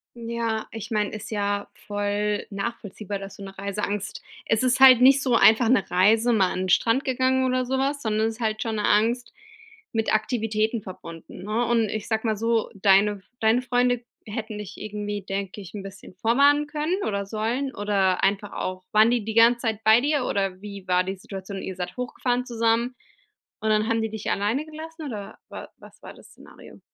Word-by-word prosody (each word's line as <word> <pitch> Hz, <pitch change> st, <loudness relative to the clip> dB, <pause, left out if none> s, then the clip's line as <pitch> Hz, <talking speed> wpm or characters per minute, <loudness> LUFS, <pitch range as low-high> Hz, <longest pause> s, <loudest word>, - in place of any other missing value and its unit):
Ja, 230 Hz, -1 st, -3 dB
ich 225 Hz, -1 st, -7 dB
mein, 210 Hz, -2 st, 0 dB
ist 215 Hz, +1 st, -8 dB
ja 205 Hz, -1 st, -1 dB, 0.2 s
voll 205 Hz, 0 st, -1 dB
nachvollziehbar, 205 Hz, -1 st, -5 dB
dass 195 Hz, 0 st, -9 dB
du 200 Hz, -, -9 dB
'ne 195 Hz, 0 st, -10 dB
Reiseangst 200 Hz, +1 st, -4 dB, 0.2 s
es 225 Hz, +1 st, +1 dB
ist 255 Hz, 0 st, +2 dB
halt 260 Hz, -2 st, +9 dB
nicht 270 Hz, +1 st, +6 dB
so 250 Hz, -3 st, +2 dB
einfach 225 Hz, +1 st, +5 dB
'ne 235 Hz, -6 st, +2 dB
Reise, 220 Hz, +6 st, +4 dB
mal 195 Hz, -4 st, +3 dB
an -, -, -3 dB
den 185 Hz, -, -2 dB
Strand 230 Hz, +8 st, +3 dB
gegangen 260 Hz, 0 st, +1 dB
oder 255 Hz, 0 st, +1 dB
sowas, 270 Hz, +3 st, -1 dB
sondern 220 Hz, 0 st, +1 dB
es 225 Hz, -, -4 dB
ist -, -, -18 dB
halt 215 Hz, -1 st, -1 dB
schon 225 Hz, -1 st, -2 dB
'ne 210 Hz, -, -1 dB
Angst 235 Hz, +4 st, +1 dB, 0.6 s
mit 225 Hz, -1 st, 0 dB
Aktivitäten 220 Hz, 0 st, 0 dB
verbunden, 170 Hz, -2 st, -10 dB
ne? 220 Hz, +4 st, 0 dB
Und 230 Hz, -2 st, +1 dB
ich 215 Hz, +1 st, -4 dB
sage 220 Hz, 0 st, -1 dB
mal 215 Hz, -2 st, 0 dB
so, 230 Hz, 0 st, 0 dB
deine 200 Hz, 0 st, +3 dB, 0.2 s
deine 225 Hz, +3 st, +3 dB
Freunde 245 Hz, -1 st, +1 dB, 0.2 s
hätten 215 Hz, 0 st, -5 dB
dich 205 Hz, -1 st, -8 dB
irgendwie, 205 Hz, -1 st, -5 dB
denke 195 Hz, +1 st, -4 dB
ich, 185 Hz, +1 st, -11 dB
'n 205 Hz, -, -5 dB
bisschen 195 Hz, -1 st, -11 dB
vorwarnen 280 Hz, +9 st, +3 dB
können 310 Hz, +6 st, -2 dB
oder 200 Hz, -1 st, -2 dB
sollen, 230 Hz, +6 st, -2 dB
oder 195 Hz, -3 st, +1 dB
einfach 200 Hz, +1 st, 0 dB
auch 185 Hz, 0 st, -4 dB
waren 215 Hz, +2 st, +5 dB
die 240 Hz, -3 st, 0 dB
die 220 Hz, -, -3 dB
ganze 235 Hz, +2 st, +5 dB
Zeit 220 Hz, -2 st, -2 dB
bei 220 Hz, +2 st, +6 dB
dir, 285 Hz, -1 st, 0 dB
oder 195 Hz, -1 st, -2 dB
wie 200 Hz, -2 st, -9 dB
war 180 Hz, 0 st, +3 dB
die 190 Hz, +1 st, -4 dB
Situation? 195 Hz, +1 st, -8 dB
Ihr 190 Hz, -, -5 dB
seid 180 Hz, +3 st, -6 dB
hochgefahren 250 Hz, 0 st, -2 dB
zusammen, 230 Hz, +1 st, +1 dB, 0.7 s
und 220 Hz, -, 0 dB
dann 215 Hz, 0 st, +2 dB
haben 230 Hz, -1 st, +1 dB
die 220 Hz, -, -2 dB
dich 220 Hz, -1 st, -5 dB
alleine 215 Hz, +8 st, 0 dB
gelassen 315 Hz, +1 st, -9 dB
oder 210 Hz, -6 st, -7 dB
wa -, -, -9 dB
was -, -, -17 dB
war -, -, -9 dB
das -, -, -17 dB
Szenario? -, -, -15 dB
220 Hz, 195 wpm, -25 LUFS, 200-240 Hz, 0.7 s, halt